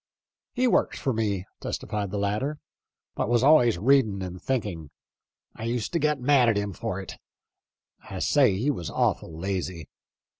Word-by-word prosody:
" - - -68
He 255 0 +1
worked 245 - +2
for 135 - -1
me," 100 -4 -1
testifies 105 -2 -3
the 100 - -4
latter, 105 +9 -1 0.3
" - - -62
but - - -1
was 120 0 +3
always 130 - +5
reading 110 -3 +3
and 90 0 -7
thinking. 105 - -3 0.7
I 110 - -6
used 120 +3 -2
to 170 - +2
get 150 -1 +1
mad 125 -1 +4
at 110 - +2
him 100 -1 -2
for 105 -1 -4
it. 95 - -8 0.9
I 95 - -6
say 125 -2 +3
he 130 +8 +1
was 85 - -5
awful 80 - -1
lazy. 90 -3 -4
110 Hz, 175 wpm, -26 LUFS, 95-135 Hz, 0.9 s, always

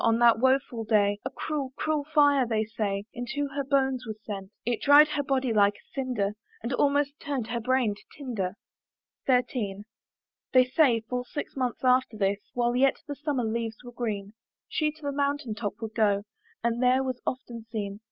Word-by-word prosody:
on 230 0 +4
that 235 -1 +5
woful 260 -2 +2
day 205 -2 +2
A 260 - -2
cruel, 275 -1 -4
cruel 305 -2 -1
fire, 285 -4 +5
they 220 -1 +1
say, 210 -3 -2
Into 265 +4 -3
her 280 - 0
bones 265 -2 +1
was 215 -1 -5
sent: 195 -3 -6 0.2
It 235 -1 -1
dried 290 +1 +7
her 295 - 0
body 265 -3 0
like 205 -1 +4
a - - -21
cinder, 250 -7 -1 0.3
And 240 +3 -2
almost 285 +2 +1
turn'd 275 -5 -2
her 235 0 -1
brain 250 -2 +2
to 205 - -15 0.2
tinder. 220 -9 -3 0.7
XIII. 240 -6 +1 0.7
They 255 -1 +7
say, 255 -3 +3
full 250 +2 -3
six 290 - -6
months 255 -2 -2
after 255 -3 +3
this, 200 0 +1 0.2
While 240 0 +1
yet 270 +4 +3
the 290 - -3
summer 285 -2 -2
leaves 225 0 -2
were 245 - -9
green, 210 -4 -4 0.3
She 305 -1 0
to 310 0 -19
the 285 - -1
mountain 280 -4 -1
top 205 -1 -3
would 220 -1 -5
go, 205 -3 +2 0.4
And 235 +1 0
there 255 +1 +4
was 255 -2 -3
often 235 -3 -4
seen. 205 -3 -4
245 Hz, 185 wpm, -28 LUFS, 220-275 Hz, 0.7 s, dried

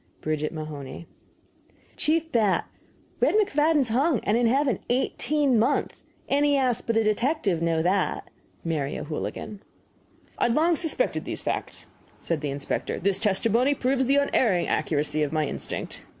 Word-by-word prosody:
BRIDGET 155 0 -1
MAHONEY. 155 -1 -7 0.9
CHIEF 320 +1 0
BAT, 215 -5 +2 0.5
Red - - +3
McFadden 315 -7 +3
is 250 - -2
hung 265 +3 +2
and 210 - +1
in 240 0 +3
heving 265 -2 +2
18 265 +1 +1
month. 255 +6 0 0.3
Any 285 0 +3
Ass 255 -4 +1
but 230 -1 -1
a 225 - +3
detective 215 - +1
know 165 -1 +1
that. 185 +2 0 0.4
MARY 150 -4 -2
O'HOOLIGAN. 165 +6 -5 0.8
"I - - +3
had 240 0 +2
long 330 +2 +3
suspected 335 +10 -1
these - - -3
facts," - - -3 0.3
said 165 -3 -3
the 145 - -2
inspector; 140 0 -3
"this 195 0 +1
testimony 230 +7 +2
proves 260 0 +1
the 275 - +3
unerring 230 -10 +2
accuracy 150 0 0
of 150 -2 0
my 155 -1 +1
instinct." - - -5
230 Hz, 150 wpm, -26 LUFS, -, 0.9 s, Red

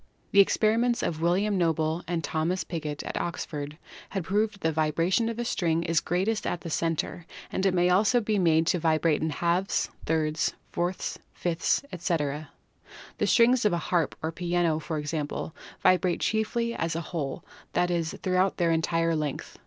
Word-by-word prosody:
The 200 - +5
experiments 230 +4 +3
of 160 -1 -2
William 190 +4 +2
Noble 160 0 +1
and 170 -1 -1
Thomas 165 +5 -1
Pigott 150 -4 -4
at - - -3
Oxford 150 -3 -4 0.3
had 195 -3 -3
proved 210 +4 0
that 200 - -20
the 160 - +1
vibration 165 +8 +1
of 230 - -4
a 240 - -2
string 170 -6 0
is 165 -1 +2
greatest 195 +5 -1
at 175 - -2
the 165 - -6
center 165 +1 -2 0.2
and - - -1
that - - +4
it 190 - +2
may 180 0 +3
also 210 +6 +4
be 215 -2 0
made 165 -2 +4
to 180 +1 +2
vibrate 160 -1 +2
in 160 - 0
halves, 175 +5 0 0.2
thirds, 155 -1 +1 0.2
fourths, 175 +2 -2
fifths, 175 +7 0
etc. 155 -4 -2 0.7
The - - +2
strings 245 +1 +5
of 210 -4 +3
a - - +2
harp 175 -3 +1
or 160 - -1
piano, 170 -2 0
for 160 0 -4
example, 150 +1 -3 0.3
vibrate 185 -1 +3
chiefly 230 +2 0
as 165 -5 -2
a 165 - -1
whole 155 -2 -4
— - - -26
that 175 0 +2
is, 170 -1 -1
throughout 185 0 +2
their 170 -1 +2
entire 165 0 +1
length. 150 -3 -4
170 Hz, 180 wpm, -27 LUFS, 160-190 Hz, 0.7 s, The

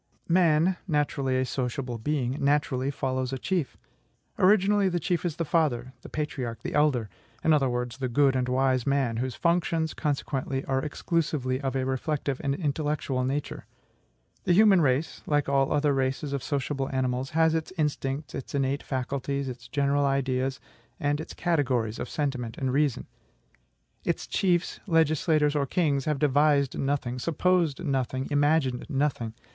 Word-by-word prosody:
Man 170 0 +3
(naturally 145 -4 0
a 130 - +1
sociable 125 -1 -3
being) 135 +1 -1
naturally 140 -2 +1
follows 130 -2 -2
a 135 - -2
chief. 175 0 -2 0.6
Originally, 200 +1 +4
the 175 -1 -1
chief 175 0 -1
is 170 -4 -2
the 165 - -2
father, 135 -6 0
the - - -11
patriarch, 135 -6 -4
the - - -4
elder; 145 -7 +2 0.4
in 160 - +4
other 135 -3 +3
words, 125 0 -3
the 130 -2 -1
good 135 +2 +3
and 125 -1 0
wise 130 -1 +1
man, 135 -5 +1
whose 125 +1 -2
functions, 170 -2 +1
consequently, 135 -2 -2
are 135 0 0
exclusively 145 -4 -1
of 135 -1 -2
a 130 -1 0
reflective 135 +1 -2
and 140 -1 0
intellectual 145 -4 -1
nature. 135 +3 -3 0.8
The 175 - +4
human 200 -1 +6
race 140 +2 0
like 145 -1 +1
all 135 -1 +2
other 145 -1 +2
races 135 +2 -1
of 140 - -2
sociable 140 -1 -2
animals 130 0 -1
has 160 -1 +4
its 160 +1 -2
instincts, 145 -1 -2
its 135 +1 -6
innate 140 +1 0
faculties, 135 +1 -3
its 125 -1 -7
general 140 0 +1
ideas, 135 -1 0 0.4
and 145 +1 0
its - - -9
categories 130 -10 0
of 125 - -4
sentiment 130 -6 -3
and 130 -2 -1
reason. 145 -2 +1 1.0
Its - - -1
chiefs, 180 -2 0
legislators, 155 -2 +2
or 140 -2 +1
kings 145 -6 +1
have 150 -2 0
devised 145 -1 +3
nothing, 135 -3 -1
supposed 170 +1 +1
nothing, 130 -2 -1
imagined 145 -3 +2
nothing. 135 -6 -1
140 Hz, 155 wpm, -27 LUFS, 130-155 Hz, 1.0 s, human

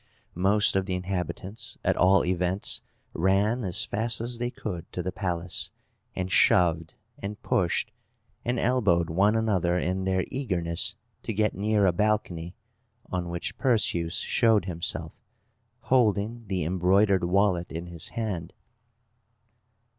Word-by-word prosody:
Most 100 +4 +3
of 95 0 +1
the 95 - -1
inhabitants, 95 +5 -4
at - - +2
all 95 +1 +4
events, 90 +2 0 0.3
ran 100 +7 +2
as 90 -3 +2
fast 110 +1 0
as 120 +1 -1
they 120 0 -1
could 90 -8 -6
to 90 - -3
the 95 - -2
palace, 90 -5 -2 0.5
and 95 0 -3
shoved, 80 -3 +3 0.2
and 100 +1 -6
pushed, 85 -3 0 0.5
and 120 +2 -1
elbowed 100 -11 +2
one 100 +6 +3
another 95 -6 +1
in 95 +1 -1
their 95 -1 +1
eagerness 90 -11 -1 0.3
to 115 - -4
get 105 +1 +1
near 105 +1 +1
a 90 - +3
balcony, 90 -4 -1 0.6
on 90 -1 -2
which 85 0 -4
Perseus 95 -9 +1
showed 110 -5 +2
himself, 85 -3 -3 0.7
holding 115 -2 +1
the 95 -3 -1
embroidered 95 +3 +3
wallet 90 -1 +1
in 80 +2 -5
his 85 -2 -5
hand. 95 -7 -4
95 Hz, 130 wpm, -27 LUFS, 90-105 Hz, 0.7 s, all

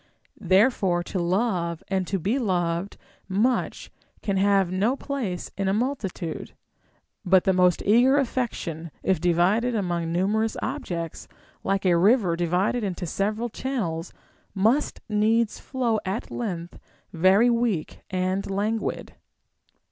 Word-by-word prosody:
Therefore 190 -2 +3
to 185 - -4
love 175 -2 0
and 190 -2 -1
to 195 - 0
be 190 +5 -1
be 275 - +1
loved 175 -4 -1 0.3
much 220 +7 0 0.3
can 200 - 0
have 195 -2 +3
no 205 +8 +1
place 255 -11 -4
in 195 -1 -1
a 190 - +2
multitude; 215 - -3 0.7
but 190 -1 +4
the 190 - +3
most 180 -1 +3
eager 245 +7 +5
affection, 230 - -2
if 190 -5 +1
divided 185 +8 +2
among 175 -5 -1
numerous 210 +6 0
objects, 175 - -4 0.4
like 195 0 0
a 180 -2 +4
river 190 0 +4
divided 180 +7 0
into 185 -2 -3
several 210 +7 -1
channels, 200 -10 -3 0.4
must 225 +10 +1
needs 220 +1 +1
flow 240 -5 -1
at 195 +4 -4
length 175 -7 -5 0.3
very 190 +8 +4
weak 230 -9 -1
and 185 +1 -1
languid. 210 +3 -2
195 Hz, 125 wpm, -25 LUFS, 175-225 Hz, 0.7 s, eager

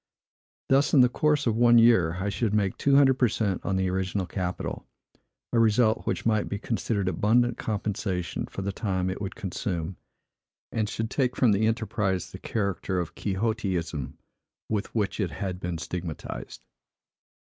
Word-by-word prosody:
Thus, 140 +3 +4
in 135 - +8
the 125 - +6
course 150 +3 +1
of 115 -3 +2
one 120 0 +6
year, 115 -8 +5
I 100 +2 -1
should 105 +1 0
make 100 -3 +1
two 140 -1 +2
hundred 135 -2 +5
per 125 - +5
cent 100 -3 -1
on 95 - -1
the 95 0 +1
original 95 +1 -1
capital; 90 0 -4 0.7
a 115 - +4
result 115 0 +3
which - - -1
might 110 -2 +1
be 100 - -2
considered 110 -2 -2
abundant 115 +7 +2
compensation 100 -4 -2
for 100 - -6
the 100 - -1
time 95 -3 -1
it 95 - -6
would 100 +1 -4
consume, 95 -4 -4 0.7
and 110 -2 -1
should 110 0 -3
take 130 -3 0
from 120 -4 +4
the 105 +2 +2
enterprise 110 -5 -1
the - - -9
character 100 -3 -2
of 85 - -4
quixotism, 95 - -2 0.5
with 105 -2 -1
which 105 -1 -1
it 95 -4 0
had 90 +4 -4
been 90 -2 -3
stigmatized. 85 -1 -6
105 Hz, 165 wpm, -27 LUFS, 95-115 Hz, 0.7 s, in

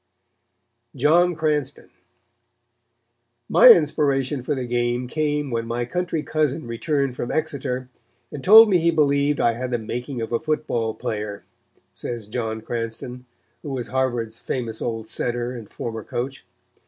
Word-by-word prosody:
John 165 +6 +3
Cranston 150 -3 -2 1.6
"My - - +7
inspiration 145 - +4
for 145 +4 -2
the 130 -2 -3
game 120 +1 0
came 150 0 -1
when 115 -1 -2
my 120 +1 -2
country 170 +2 -2
cousin 155 -1 -1
returned 135 +3 -1
from 120 - -4
Exeter 140 -5 -2 0.4
and 140 - -7
told 220 +4 +10
me 190 -4 +3
he 170 +1 +2
believed 145 -2 +2
I 115 - +3
had 125 +2 -4
the 120 - 0
making 120 +3 -5
of 115 0 -4
a 115 - +1
football 150 -8 -1
player," 105 -1 -4 0.5
says 115 +4 -5
John 110 0 -3
Cranston, 120 +2 -5 0.3
who 150 - -7
was 130 -3 -4
Harvard's 120 -4 -1
famous 115 -4 -4
old 115 -2 -3
center 120 +1 -2
and 115 -5 -8
former 115 -2 -5
coach. 130 +6 -5
125 Hz, 140 wpm, -23 LUFS, 115-150 Hz, 1.6 s, told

